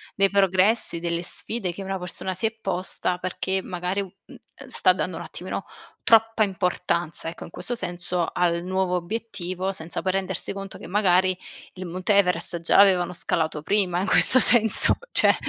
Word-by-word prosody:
dei 195 Hz, -1 st, +3 dB
progressi, 195 Hz, 0 st, +2 dB
delle 170 Hz, 0 st, -2 dB
sfide 195 Hz, +1 st, -2 dB
che 195 Hz, -, -8 dB
una 195 Hz, 0 st, -3 dB
persona 180 Hz, +1 st, -4 dB
si 220 Hz, +5 st, -2 dB
è 220 Hz, -, +1 dB
posta 180 Hz, -2 st, -2 dB
perché 190 Hz, +1 st, -2 dB
magari 180 Hz, +2 st, -3 dB
u 190 Hz, -, -8 dB
uhm, -, -, -14 dB, 0.2 s
ehm, -, -, -13 dB
sta -, -, +3 dB
dando -, -, -3 dB
un -, -, -6 dB
attimino -, -, -6 dB, 0.4 s
troppa 225 Hz, -1 st, +4 dB
importanza 180 Hz, -4 st, -1 dB
ecco, 170 Hz, -, -9 dB
in -, -, -11 dB
questo 245 Hz, -, -4 dB
senso, 175 Hz, -4 st, -3 dB
al 170 Hz, -1 st, 0 dB
nuovo 185 Hz, 0 st, -1 dB
obiettivo, 190 Hz, -1 st, -4 dB
senza 165 Hz, -1 st, -6 dB
poi 185 Hz, -, +1 dB
rendersi 190 Hz, -1 st, -2 dB
conto 195 Hz, -1 st, -8 dB
che -, -, -11 dB
magari 185 Hz, -1 st, +2 dB, 0.4 s
il 185 Hz, 0 st, -8 dB
monte 185 Hz, +4 st, -1 dB
Everest 180 Hz, -2 st, +1 dB
già 165 Hz, -, +2 dB
l'avevano 185 Hz, -3 st, +5 dB
scalato 160 Hz, -3 st, -2 dB
prima 185 Hz, -2 st, +1 dB
in -, -, -1 dB
questo 255 Hz, -, +5 dB
senso, 225 Hz, -3 st, +5 dB
cioè, -, -, +5 dB
185 Hz, 175 wpm, -24 LUFS, 175-195 Hz, 0.4 s, l'avevano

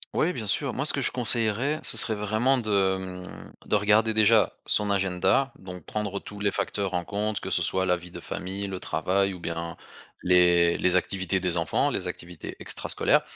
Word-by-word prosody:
Oui, 175 Hz, +3 st, +1 dB
bien 110 Hz, -8 st, -6 dB
sûr. 135 Hz, +5 st, 0 dB
Moi 140 Hz, -, -3 dB
ce -, -, +5 dB
que 140 Hz, -, -2 dB
je -, -, 0 dB
conseillerais, 120 Hz, +4 st, +3 dB
ce -, -, +2 dB
serait 110 Hz, -, +6 dB
vraiment 110 Hz, +6 st, 0 dB
de, 110 Hz, -4 st, -3 dB, 0.5 s
hem, 90 Hz, -, -12 dB, 0.2 s
de -, -, +2 dB
regarder 105 Hz, +2 st, +2 dB
déjà 110 Hz, 0 st, +4 dB
son 105 Hz, -1 st, 0 dB
agenda, 95 Hz, +6 st, +1 dB
donc 90 Hz, -3 st, -10 dB
prendre 105 Hz, -2 st, -4 dB
tous 105 Hz, +1 st, -11 dB
les 100 Hz, 0 st, 0 dB
facteurs 100 Hz, -3 st, -3 dB
en 90 Hz, -1 st, -2 dB
compte. 105 Hz, +2 st, -2 dB
Que -, -, -6 dB
ce -, -, +1 dB
soit 95 Hz, 0 st, +1 dB
la 90 Hz, -1 st, +2 dB
vie 90 Hz, 0 st, -10 dB
de -, -, -10 dB
famille, 95 Hz, +2 st, -5 dB
le 95 Hz, -2 st, -5 dB
travail 95 Hz, +1 st, -1 dB
ou -, -, -11 dB
bien 85 Hz, 0 st, -5 dB, 0.5 s
les 90 Hz, -1 st, +4 dB
les 90 Hz, 0 st, +1 dB
activités 95 Hz, 0 st, 0 dB
des 90 Hz, -1 st, -1 dB
enfants, 80 Hz, -1 st, 0 dB
les -, -, -3 dB
activités 85 Hz, -1 st, -8 dB
extrascolaires. -, -, +1 dB
100 Hz, 200 wpm, -25 LUFS, 90-110 Hz, 0.5 s, serait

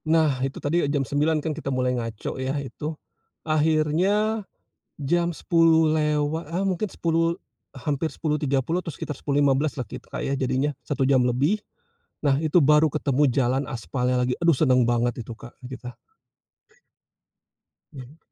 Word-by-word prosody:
Nah 155 Hz, -5 st, +2 dB
itu 135 Hz, +1 st, -2 dB
tadi 165 Hz, +5 st, 0 dB
ya -, -, 0 dB
jam 140 Hz, -2 st, 0 dB
9.00 150 Hz, +3 st, 0 dB
kan 160 Hz, -, 0 dB
kita 150 Hz, -2 st, -5 dB
mulai 130 Hz, -1 st, 0 dB
ngaco 115 Hz, +1 st, -4 dB
ya 135 Hz, +2 st, -1 dB
itu, 145 Hz, +3 st, -5 dB, 0.5 s
akhirnya, 160 Hz, +8 st, +2 dB, 0.6 s
jam 170 Hz, +4 st, +1 dB
10.00 165 Hz, -1 st, +3 dB
lewa 150 Hz, 0 st, 0 dB
ah, 180 Hz, +4 st, -1 dB
mungkin 195 Hz, +2 st, -1 dB
10.00, 165 Hz, 0 st, 0 dB, 0.3 s
hampir 145 Hz, +3 st, -2 dB
10.30 150 Hz, +1 st, -1 dB
atau 175 Hz, -, -7 dB
sekitar 150 Hz, 0 st, -5 dB
10.15-lah 140 Hz, 0 st, +1 dB
kita 125 Hz, 0 st, -6 dB
ya 135 Hz, -, -1 dB
jadinya 135 Hz, +2 st, 0 dB
1 135 Hz, -2 st, -1 dB
jam 130 Hz, -1 st, +4 dB
lebih, 135 Hz, -, +1 dB, 0.6 s
nah 145 Hz, -2 st, +3 dB
itu 160 Hz, +2 st, +2 dB
baru 150 Hz, +2 st, +5 dB
ketemu 145 Hz, -2 st, +1 dB
jalan 130 Hz, +1 st, +1 dB
aspalnya 125 Hz, 0 st, -1 dB
lagi, 125 Hz, -, 0 dB
aduh 170 Hz, -5 st, +4 dB
seneng 130 Hz, -4 st, +4 dB
banget 120 Hz, 0 st, 0 dB
itu 120 Hz, -, -7 dB
Kak, 120 Hz, -, -12 dB, 0.2 s
kita. 125 Hz, -1 st, -8 dB, 2.0 s
Mhm. 135 Hz, +2 st, -11 dB
145 Hz, 145 wpm, -24 LUFS, 130-160 Hz, 2.0 s, baru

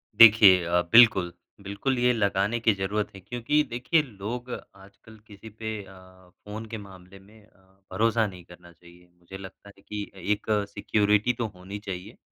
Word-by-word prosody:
देखिए 105 Hz, -5 st, +8 dB
अ, 85 Hz, +1 st, +1 dB
बिल्कुल, 110 Hz, -7 st, +6 dB, 0.3 s
बिल्कुल 100 Hz, +7 st, -3 dB
ये 125 Hz, 0 st, +3 dB
लगाने 100 Hz, 0 st, 0 dB
की 115 Hz, -1 st, +3 dB
ज़रूरत 100 Hz, +2 st, -2 dB
है -, -, -10 dB
क्योंकि 120 Hz, +8 st, 0 dB
देखिए 125 Hz, +7 st, +1 dB
लोग 120 Hz, +1 st, -7 dB, 0.3 s
आजकल 100 Hz, +3 st, -17 dB
किसी 105 Hz, +1 st, -13 dB
पे 110 Hz, +1 st, -6 dB
अ, 95 Hz, -1 st, -17 dB, 0.2 s
फ़ोन 105 Hz, +2 st, -7 dB
के 115 Hz, -, -5 dB
मामले 95 Hz, -2 st, -14 dB
में 105 Hz, +2 st, -20 dB
अ, 105 Hz, -, -30 dB, 0.3 s
भरोसा 110 Hz, +3 st, +1 dB
नहीं 90 Hz, -3 st, -11 dB
करना 90 Hz, 0 st, -16 dB
चाहिए, 85 Hz, +1 st, -20 dB
मुझे 90 Hz, +2 st, -11 dB
लगता 95 Hz, +1 st, -12 dB
है -, -, -20 dB
कि 105 Hz, -1 st, -4 dB
अ, -, -, -15 dB
एक 105 Hz, +3 st, -2 dB, 0.3 s
सिक्योरिटी 105 Hz, +2 st, +1 dB
तो 115 Hz, -1 st, -3 dB
होनी 95 Hz, +3 st, -8 dB
चाहिए। 100 Hz, +2 st, -8 dB
100 Hz, 170 wpm, -26 LUFS, 95-110 Hz, 0.3 s, देखिए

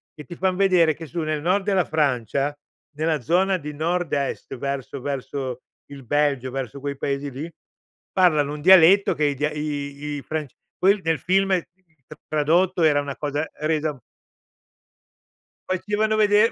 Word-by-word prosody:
che 150 Hz, -, -9 dB
ti 175 Hz, -, -9 dB
fan 185 Hz, +1 st, 0 dB
vedere 180 Hz, -5 st, +4 dB
che 160 Hz, +1 st, -9 dB
su 170 Hz, +4 st, -5 dB
nel 155 Hz, -1 st, -2 dB
nord 185 Hz, +4 st, +1 dB
della 195 Hz, -3 st, +2 dB
Francia, 140 Hz, -1 st, 0 dB, 0.4 s
nella 155 Hz, 0 st, 0 dB
zona 185 Hz, +8 st, +2 dB
di 150 Hz, -3 st, -7 dB
nord-est 155 Hz, -4 st, -2 dB
verso 140 Hz, 0 st, -4 dB
verso 130 Hz, -2 st, -4 dB, 0.3 s
il 140 Hz, -3 st, -11 dB
Belgio, 140 Hz, -2 st, 0 dB
verso 135 Hz, -1 st, -5 dB
quei 140 Hz, -1 st, -4 dB
paesi 140 Hz, +1 st, -2 dB
lì, 150 Hz, +6 st, -6 dB, 0.6 s
parlano 155 Hz, -6 st, +3 dB
un 150 Hz, -, -7 dB
dialetto 190 Hz, +2 st, +7 dB
che 150 Hz, -, -1 dB
i 145 Hz, -1 st, +1 dB
di 150 Hz, 0 st, -3 dB
i -, -, -6 dB
fra 155 Hz, -1 st, -3 dB, 0.3 s
que 200 Hz, +2 st, +4 dB
nel 160 Hz, -1 st, +1 dB
film 190 Hz, +3 st, +2 dB, 0.7 s
tradotto 170 Hz, +4 st, +2 dB
era 150 Hz, -2 st, +4 dB
una 140 Hz, -1 st, -5 dB
cosa 150 Hz, +1 st, -2 dB
resa 155 Hz, -1 st, -1 dB, 1.7 s
facevano 210 Hz, +3 st, 0 dB
vedere 210 Hz, +1 st, +4 dB
155 Hz, 145 wpm, -23 LUFS, 140-180 Hz, 1.7 s, dialetto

